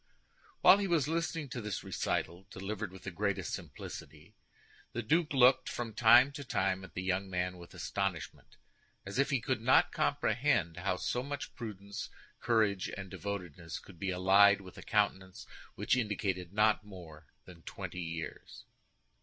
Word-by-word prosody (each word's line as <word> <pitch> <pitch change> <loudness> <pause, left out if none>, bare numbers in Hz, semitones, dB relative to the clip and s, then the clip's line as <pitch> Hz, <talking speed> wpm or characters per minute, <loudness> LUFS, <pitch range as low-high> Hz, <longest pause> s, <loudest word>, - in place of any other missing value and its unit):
While 200 - +8
he 200 - 0
was 165 -6 +2
listening 165 -1 -1
to 125 - -5
this 105 -3 -4
recital, 90 +3 -2
delivered 100 0 -5
with 95 - -12
the 95 - -5
greatest 100 0 -2
simplicity, - - -8 0.6
the 120 - -3
duke 160 +8 +2
looked 130 -1 +5
from 115 -2 -4
time 120 +5 +7
to 140 +1 -7
time 95 -6 0
at 90 -4 -12
the 90 - -3
young 95 +1 -1
man 90 0 -2
with 85 - -13
astonishment, 95 -4 -4 0.5
as 100 +6 -4
if 140 - +3
he 140 - +2
could - - -1
not - - +5
comprehend 85 0 +1
how 90 +1 0
so 125 - -1
much 140 +2 -5
prudence, 100 -3 -7 0.3
courage, 105 -5 +1
and 95 -2 -7
devotedness 90 -5 -5
could 90 -4 -14
be 100 - -2
allied 95 +3 +5
with 95 -2 -12
a - - -9
countenance 95 -1 0 0.3
which - - +1
indicated 95 -6 -2
not 105 +1 +3
more 85 -7 -12 0.2
than 85 -2 -13
twenty 90 - -6
years. 80 -1 -7
100 Hz, 160 wpm, -32 LUFS, 90-120 Hz, 0.6 s, While